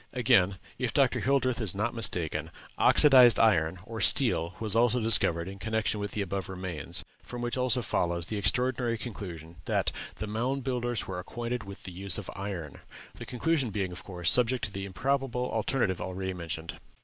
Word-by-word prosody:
Again, 100 -6 +3 0.2
if - - -2
Dr. - - +3
Hildreth 130 -3 +1
is 100 -4 0
not 105 +4 -1
mistaken, 80 -8 0 0.3
oxydized 130 -5 +6
iron 90 -6 +3
or 115 -1 -6
steel 95 -10 +2
was 110 -1 +2
also 120 +1 +3
discovered 95 -7 +5
in 95 0 -8
connection 110 0 -1
with 100 0 -4
the 105 - -1
above 95 -1 -4
remains, 90 -5 -5 0.2
from 120 -1 -7
which 120 - -1
also 125 -1 +1
follows 85 -3 -1
the 105 - -4
extraordinary 120 +3 0
conclusion 85 -8 -8
that - - +1 0.2
the 110 - -4
Mound 125 +6 -2
Builders 120 -3 -2
were 95 -2 -5
acquainted 120 +4 -5
with 100 0 -10
the 95 - -7
use 95 0 0
of 105 - -6
iron, 95 -7 -6 0.3
the - - -10
conclusion 135 0 0
being, 95 -3 -3
of 90 - -9
course, 90 -4 0
subject 125 0 +3
to 100 - -1
the 95 0 -5
improbable 125 +4 -1
alternative 110 -4 0
already 95 0 -4
mentioned." 85 -1 -6
105 Hz, 175 wpm, -29 LUFS, 90-120 Hz, 0.3 s, oxydized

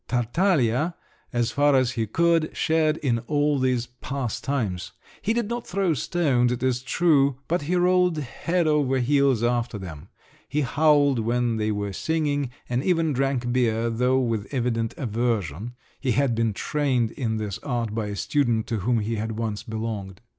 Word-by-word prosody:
Tartaglia, 135 - +1 0.4
as 120 -1 0
far 145 0 +3
as 130 -2 +3
he 115 -3 -2
could, 165 +5 +2
shared 155 -1 +2
in 120 -4 +1
all 145 -1 +1
these 130 -2 +1
pastimes; 120 -7 -3 0.3
he 215 - 0
did 235 -1 0
not 235 +1 -4
throw 190 -2 +1
stones, 135 -5 +1
it 125 0 -3
is 125 -1 +1
true, 140 -2 +2
but 175 0 0
he 165 +5 -1
rolled 180 -1 +3
head 165 +5 -1
over 145 -4 +2
heels 135 -2 +2
after 120 -2 0
them; 85 -2 -9 0.4
he 150 - 0
howled 145 -1 +3
when 120 0 0
they 110 0 0
were 100 -1 -3
singing, 145 - -1 0.2
and 125 +2 -1
even 165 -4 +2
drank 130 -2 0
beer, 115 -2 +1
though 125 +3 +2
with 115 -5 -2
evident 115 -4 -1
aversion; 115 - -2 0.3
he 130 -4 0
had 135 -1 +2
been 115 -1 +1
trained 125 0 0
in 110 -5 -2
this 105 -3 -4
art 120 -5 -2
by 110 -1 -2
a 100 - -4
student 120 -2 +1
to 115 - -2
whom 115 +3 +1
he 110 +2 -2
had 110 +1 -3
once 110 -3 -2
belonged. 110 -4 -5
125 Hz, 170 wpm, -25 LUFS, 115-145 Hz, 0.4 s, far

